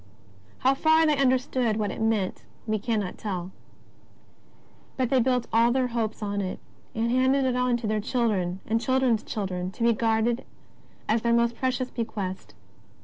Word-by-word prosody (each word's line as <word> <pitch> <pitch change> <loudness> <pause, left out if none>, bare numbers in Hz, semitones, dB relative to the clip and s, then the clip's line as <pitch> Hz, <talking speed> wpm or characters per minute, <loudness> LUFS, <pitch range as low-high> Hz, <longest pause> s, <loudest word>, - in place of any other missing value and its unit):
How 265 +1 +4
far 315 +3 +4
they 305 -1 +3
understood 255 -4 +1
what 210 -2 -1
it - - -6
meant, 220 -4 0 0.2
we 215 -1 0
cannot 210 -4 -2
tell. 185 -3 -4 1.5
P>ut 255 -3 0
they 265 - +4
built 250 0 +1
all 230 +1 +4
their 255 0 +1
hopes 225 -2 -2
on 205 0 -1
it, 185 -1 -4 0.4
and 230 +1 0
handed 260 +2 +3
it 255 -1 +1
on 250 -1 +2
to 235 - -6
their 215 0 0
children 205 -6 -1
and 225 +1 0
children's 260 -3 +2
children 185 -3 -3
to 230 - -4
be 235 0 +5
guarded 225 +1 +1 0.6
as 220 +1 +2
their 235 0 +2
most 235 0 +2
precious 255 0 -1
bequest. 205 -5 -5
230 Hz, 165 wpm, -26 LUFS, 215-255 Hz, 1.5 s, be